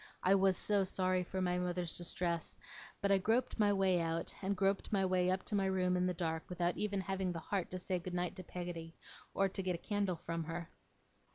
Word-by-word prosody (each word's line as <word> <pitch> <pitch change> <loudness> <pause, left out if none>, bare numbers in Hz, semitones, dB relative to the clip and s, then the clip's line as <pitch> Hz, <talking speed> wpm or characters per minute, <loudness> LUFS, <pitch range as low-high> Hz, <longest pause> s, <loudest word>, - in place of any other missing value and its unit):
I 185 - +5
was 190 -1 +4
so 205 -2 +3
sorry 185 -1 +1
for 185 +1 -2
my 180 0 +1
mother's 180 -1 -1
distress; 170 -1 -1 0.5
but 200 - +3
I 195 - +5
groped 235 +5 +1
my 205 -1 +5
way 190 -2 +3
out, 165 0 -2
and 195 0 -1
groped 195 +1 +1
my 195 -2 +3
way 185 -1 +2
up 185 0 +1
to - - -5
my 195 -1 +2
room 185 -1 +2
in 180 0 +2
the 180 - +1
dark, 160 -1 -2
without 175 -1 0
even 200 -2 -1
having 190 -1 -1
the 165 - -4
heart 185 +2 -2
to 185 - -4
say 185 0 -1
good 180 +1 -5
night 175 +1 -1
to 185 - -6
Peggotty, 175 -2 -6 0.4
or 195 - +4
to 195 - -2
get 185 -1 0
a 170 - -11
candle 205 -4 +1
from 165 0 -4
her. 165 +1 -5
185 Hz, 225 wpm, -36 LUFS, 175-195 Hz, 0.5 s, I